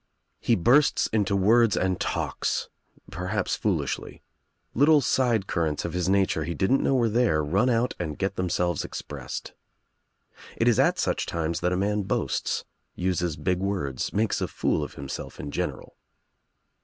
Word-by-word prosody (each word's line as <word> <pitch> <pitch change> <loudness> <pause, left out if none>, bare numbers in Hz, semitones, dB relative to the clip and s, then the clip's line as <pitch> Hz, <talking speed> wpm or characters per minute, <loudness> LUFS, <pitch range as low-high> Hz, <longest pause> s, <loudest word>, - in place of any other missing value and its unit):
He - - +2
bursts 130 - +4
into 100 -3 +1
words 110 +3 +4
and 95 -1 0
talks, - - -2 0.4
perhaps 90 +3 -2
foolishly. - - -2 0.5
Little 150 +4 +5
side 120 -6 +1
currents 80 -6 -1
of 85 - -4
his 90 0 0
nature 95 -5 +2
he 85 +2 -4
didn't 95 - +2
know 135 - +2
were 120 -3 +3
there 110 -9 +2
run 100 - +2
out 120 +1 +1
and 80 -4 -4
get 95 0 -1
themselves 90 -2 0
expressed. - - -7 1.0
It - - +1
is - - +4
at - - +3
such - - -1
times 85 0 -2
that 90 +1 0
a 90 - 0
man 105 +2 0
boasts, 95 - -1 0.3
uses 90 -3 -1
big 90 -1 0
words, 90 -10 -2
makes 110 +1 0
a - - 0
fool 75 - 0
of - - -7
himself 70 0 -7
in 70 - -5
general. - - -4
95 Hz, 155 wpm, -26 LUFS, 85-110 Hz, 1.0 s, Little